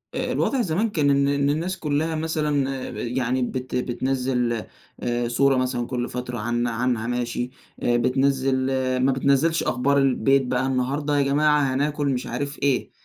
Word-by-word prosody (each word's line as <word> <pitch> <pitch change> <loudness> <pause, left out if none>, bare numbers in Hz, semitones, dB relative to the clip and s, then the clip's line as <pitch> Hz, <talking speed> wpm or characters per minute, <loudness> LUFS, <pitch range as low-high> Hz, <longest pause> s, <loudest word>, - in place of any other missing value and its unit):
آآ، - - -2
الوضع 270 -2 +1
زمان 195 +3 0
كان 150 -8 +1
إن 140 0 +3
إن 140 - +1
إن 140 0 +1
الناس 170 +6 -1
كلّها 155 +1 -1
مثلًا 150 -3 0 0.2
آآ، - - -7
يعني 125 +1 -1
بت 125 0 -3
بتنزّل 125 0 0 0.5
آآ، 120 0 -1
صورة 135 +3 +3
مثلًا 125 -2 -1
كل 125 -1 -3
فترة 125 0 -5
عن 120 +2 -1
عنها 120 -1 -1
ماشي 120 0 -2 0.3
بتنزّل 130 +2 +2 0.4
ما 130 +2 +3
بتنزّلش 140 +5 +2
أخبار 140 +3 +1
البيت 135 0 +3
بقى، 125 +1 0
النهارده 140 +3 0
يا 140 - +3
جماعة 145 -1 +2
هناكل 145 +2 0
مش 130 -2 -1
عارف 140 +4 -4
إيه، 140 -3 +1
135 Hz, 160 wpm, -24 LUFS, 125-145 Hz, 0.5 s, إن